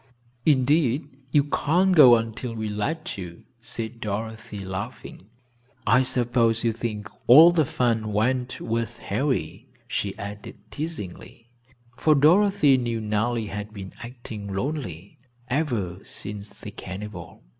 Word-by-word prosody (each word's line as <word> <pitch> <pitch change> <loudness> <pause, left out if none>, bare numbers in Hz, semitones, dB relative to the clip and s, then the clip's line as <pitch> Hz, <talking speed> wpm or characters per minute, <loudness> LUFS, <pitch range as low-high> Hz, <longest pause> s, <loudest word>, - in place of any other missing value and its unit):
"Indeed 140 -1 +2
you 145 +1 +4
can't 175 +6 +2
go 130 -7 +9
until 115 +1 -3
we 110 -1 -3
let 105 +6 -3
you," 85 -2 -8 0.2
said 115 0 -5
Dorothy, 105 -1 -5
laughing. 100 +1 -7 0.6
"I 115 +5 +5
suppose 120 -3 +1
you 115 - +2
think 110 -2 -4 0.2
all 155 +8 +10
the 160 -3 +2
fun 115 -4 0
went 125 +4 0
with 115 0 -2
Harry," 135 -2 -2 0.2
she 100 -5 -2
added, 100 +1 -8
teasingly, 120 - -7 0.5
for 155 -1 +4
Dorothy 160 -1 +5
knew 120 -2 -2
Nellie 110 +2 -1
had 105 +1 -6
been 95 -1 -8
acting 120 -4 -8
lonely 110 - -4 0.3
ever 115 - -1
since 105 0 -7
the - - -10
carnival. 100 +3 -8
115 Hz, 125 wpm, -25 LUFS, 105-135 Hz, 0.6 s, all